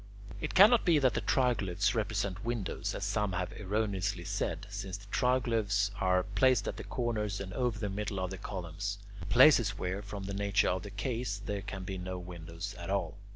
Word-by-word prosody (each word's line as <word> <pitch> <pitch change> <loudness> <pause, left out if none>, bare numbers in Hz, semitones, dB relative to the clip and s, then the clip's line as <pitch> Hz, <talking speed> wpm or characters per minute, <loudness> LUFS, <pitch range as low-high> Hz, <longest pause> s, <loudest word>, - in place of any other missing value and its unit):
It - - -4
cannot 220 +5 +8
be 170 -4 +4
that 130 -5 +3
the - - -1
triglyphs 105 -6 +1
represent 100 -4 -1
windows, 115 -4 -2
as - - -4
some 100 -1 0
have 90 -1 -2
erroneously 100 -2 -1
said, 95 -2 -2
since 100 -2 -5
the 100 - -14
triglyphs 110 -6 +2
are 90 -1 +3
placed 105 +3 +2
at - - -3
the - - -6
corners 105 -5 -2
and 95 -1 -6
over 125 -4 0
the 105 -1 -2
middle 100 0 -3
of 95 0 -2
columns 95 +2 -4 0.3
places 120 -6 +6
where, 95 +2 -2
from 100 -1 -7
the 100 +1 -4
nature 100 0 +2
of 90 0 0
the 100 - -7
case, 115 0 -3
there 100 -1 -2
can 100 -1 -6
be 95 0 -5
no 90 0 -4
windows 85 +1 -7
at 85 +1 -6
all. 100 0 -1
100 Hz, 190 wpm, -32 LUFS, 95-110 Hz, 0.3 s, cannot